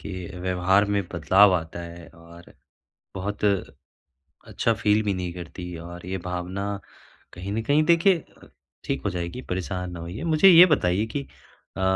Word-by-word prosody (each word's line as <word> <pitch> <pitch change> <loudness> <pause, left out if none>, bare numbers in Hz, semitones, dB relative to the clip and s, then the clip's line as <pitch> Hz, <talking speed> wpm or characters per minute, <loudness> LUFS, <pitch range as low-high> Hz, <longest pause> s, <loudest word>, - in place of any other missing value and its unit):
के 90 -2 -7
व्यवहार 95 +2 +2
में 100 -1 0
बदलाव 95 +4 +5
आता 85 0 -4
है 85 0 -10
और 85 +1 -15 0.6
बहुत 100 +2 -4 1.0
अच्छा 115 - 0
फ़ील 105 0 +2
भी 100 -2 0
नहीं 90 -1 -4
करती 90 0 -8
और 85 +1 -10
ये 95 +1 -3
भावना 90 +2 -4 0.7
कहीं 95 +3 -6
न 110 +2 -1
कहीं 145 +6 +3
देखिए 170 +1 +3 0.6
ठीक - - -3
हो - - 0
जाएगी। 85 +8 -5
परेशान 90 0 -3
ना 85 - -7
होइए। 85 +4 -7
मुझे 165 +4 +5
ये 175 0 +9
बताइए 105 - +1
कि 140 +5 -5 0.5
अ, - - -4
95 Hz, 155 wpm, -24 LUFS, 85-105 Hz, 1.0 s, ये